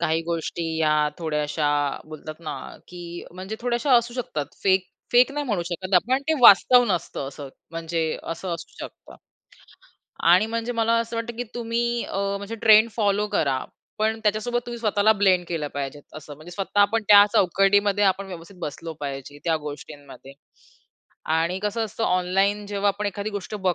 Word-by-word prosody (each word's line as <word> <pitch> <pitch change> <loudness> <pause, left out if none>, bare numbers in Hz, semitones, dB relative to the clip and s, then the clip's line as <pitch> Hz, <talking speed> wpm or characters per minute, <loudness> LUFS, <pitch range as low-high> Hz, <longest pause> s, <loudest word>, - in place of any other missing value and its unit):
काही 165 -1 0
गोष्टी 170 0 -3
या 150 -1 +2
थोड्याशा 150 -2 -1 0.4
बोलतात 155 0 -8
ना 155 -3 -5 0.3
की 175 -1 -8
म्हणजे 190 +4 -7
थोड्याश्या 245 +3 0
असू 235 +1 0
शकतात. 155 - -3 0.2
फेक, 190 -1 +3 0.3
फेक 250 +3 +5
नाही 290 -1 -3
म्हणू 205 -7 -1
शकत 185 +2 -3
आपण 250 +9 +3
ते 320 - +3
वास्तव 245 +4 +8
नसतं 140 -5 -3
असं 140 0 -9 0.2
म्हणजे 165 -1 -2
असं 170 +1 -4
असू 165 - -10
शकतं - - -10 1.2
आणि 190 +5 +5
म्हणजे 230 +1 -3
मला 230 -1 +1
असं 230 0 -5
वाटतं 230 0 -4
की 245 - -3
तुम्ही 235 0 -1
अ, 195 - -5 0.2
म्हणजे 200 +3 -6
ट्रेंड 220 0 +5
फॉलो 205 -1 +1
करा. 140 -10 0 0.3
पण 220 +1 0
त्याच्यासोबत 215 +3 0
तुम्ही 240 0 -6
स्वतःला 215 -1 +3
ब्लेंड 190 -3 +2
केलं 155 -4 -3
पाहिजे 140 0 -4 0.2
असं, 150 -1 -9
म्हणजे 155 +4 -12
स्वतः 195 +3 -1
आपण 220 +3 +3
त्या 205 -1 +9
चौकटीमध्ये 200 +2 +3
आपण 195 +1 +1
व्यवस्थित 180 +1 -10
बसलो 165 +2 -6
पाहिजे 140 0 -6
त्या 165 -2 +2
गोष्टींमध्ये 145 -2 -10 1.0
आणि 165 +3 +1
कसं 220 +2 -1
असतं 220 +1 -4
ऑनलाईन 195 +3 +1
जेव्हा 205 0 0
आपण 205 +1 -1
एखादी 200 +2 -4
गोष्ट 205 0 -6
बघ 180 - +3
195 Hz, 165 wpm, -24 LUFS, 165-220 Hz, 1.2 s, त्या